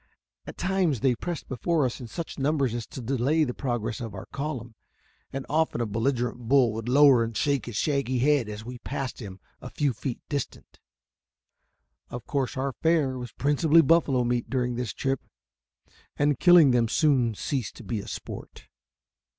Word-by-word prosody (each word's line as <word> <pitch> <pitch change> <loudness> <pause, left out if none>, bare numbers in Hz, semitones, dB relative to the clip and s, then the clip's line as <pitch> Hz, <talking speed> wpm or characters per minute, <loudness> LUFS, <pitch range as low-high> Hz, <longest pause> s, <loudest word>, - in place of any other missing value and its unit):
At - - -8
times 180 - 0
they 130 -1 +3
pressed 170 +6 -5
before 150 +4 0
us 125 - -3
in 120 - -7
such 165 +4 -6
numbers 140 -3 +1
as 120 -2 -4
to 130 - -8
delay 135 +6 +1
the 125 -4 -2
progress 120 -2 -3
of 115 -3 -6
our 95 - -7
column, 135 -5 -5 0.6
and 135 0 -5
often 160 -4 0
a 120 - 0
belligerent 120 +3 -1
bull 130 -5 +4
would 115 +2 -4
lower 135 -2 +6
and 115 -1 -4
shake 140 -4 0
his 120 - -6
shaggy 140 0 0
head 135 -3 +2
at - - -4
us 105 - -7
as - - -13
we 125 0 -8
passed 135 0 -5
him 100 -4 -8 0.2
a - - -7
few 145 -3 0
feet 125 +2 -5
distant. 145 -3 -5 1.3
Of 120 -1 -7
course 140 -1 -2
our 135 0 -1
fare 160 -5 +2
was 125 -2 -7
principally 150 +3 +4
buffalo 145 -5 +3
meat 120 0 -1
during 125 -2 0
this 120 -2 -3
trip, 135 -1 -2 1.0
and 145 -2 +2
killing 175 -6 +7
them 120 -2 +3
soon 125 -5 +2
ceased 130 0 -3
to - - -11
be 115 - -3
a - - -8
sport. - - -8
130 Hz, 185 wpm, -26 LUFS, 120-145 Hz, 1.3 s, killing